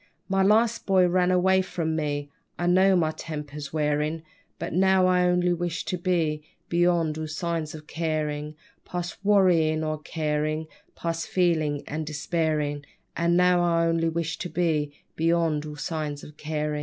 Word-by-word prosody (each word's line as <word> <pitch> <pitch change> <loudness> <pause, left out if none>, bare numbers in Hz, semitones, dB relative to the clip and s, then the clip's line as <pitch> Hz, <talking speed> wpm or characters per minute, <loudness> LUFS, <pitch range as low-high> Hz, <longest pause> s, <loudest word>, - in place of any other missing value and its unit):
My 195 0 +1
last 220 +4 +3
boy 190 -2 +5
ran 180 0 +2
away 190 +1 +4
from 165 -3 -2
me, 145 -2 -2 0.3
I 175 - -2
know 190 +2 +5
my 160 -3 +2
temper's 150 -2 -7
wearin', 150 +1 0 0.3
But - - -5
now 190 +1 +4
I 180 -1 +3
only 180 0 +2
wish 175 -1 -3
to - - -2
be 170 -4 0 0.3
Beyond 170 -2 +2
all 155 - -3
signs 160 0 -3
of 155 -1 -10
carin'. 155 -2 -2 0.3
_Past 175 0 -5
wearyin' 175 -6 +3
or 155 0 -2
carin', 155 0 -2 0.3
Past 165 0 -3
feelin' 155 -5 +1
and 155 0 -4
despairin'; 150 -2 -1 0.3
And 170 +1 +2
now 180 0 +4
I 170 -1 +2
only 165 0 +1
wish 165 0 -3
to 180 - -4
be 155 -5 0 0.2
Beyond 165 -2 +1
all 150 - -7
signs 150 -1 -4
of 150 - -12
carin'. 150 -1 -3
165 Hz, 155 wpm, -26 LUFS, 150-180 Hz, 0.3 s, boy